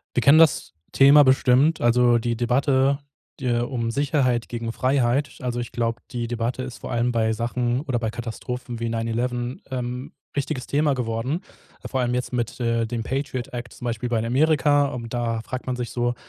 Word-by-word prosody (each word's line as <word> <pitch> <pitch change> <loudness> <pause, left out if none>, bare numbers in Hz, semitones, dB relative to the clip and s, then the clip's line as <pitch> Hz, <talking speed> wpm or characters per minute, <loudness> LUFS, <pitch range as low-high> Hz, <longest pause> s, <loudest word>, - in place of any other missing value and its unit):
Wir 125 - +3
kennen 140 +5 +6
das 160 - +3 0.2
Thema 140 +2 +7
bestimmt, 130 +3 +4
also 120 0 +4
die 115 0 -1
Debatte 135 +3 +2 0.4
de 120 -2 +1
um 120 -2 -2
Sicherheit 130 -3 +1
gegen 115 -1 -3
Freiheit. 130 +2 +1
Also 125 -1 -3
ich 120 -1 -4
glaube, 115 0 -2
die 120 -1 -3
Debatte 120 +2 -2
ist 130 -2 -7
vor - - -7
allem 120 +1 +1
bei 110 -1 +1
Sachen 120 +2 -1
oder 135 -5 -2
bei 110 -2 -2
Katastrophen 120 +1 -6
wie 115 0 -2
9/11, 120 +2 -2
ähm, 125 0 -4 0.2
wichtiges 140 -2 -2
Thema 145 0 +2
geworden. 125 +6 -2 0.5
Vor 135 - -1
allem 120 -1 0
jetzt 125 +1 -2
mit, 120 +1 -2
äh, 115 -1 +1
dem 115 0 -3
Patriot-Act 125 -2 -4
zum 120 - -8
Beispiel 120 +1 -2
bei 115 - +1
in 115 - -1
Amerika. 145 +2 +3
Und 120 -2 -6
da 115 -2 -1
fragt 130 +3 -6
man 130 -1 -2
sich 120 -2 -4
so: 120 0 0
125 Hz, 185 wpm, -24 LUFS, 115-130 Hz, 0.5 s, Thema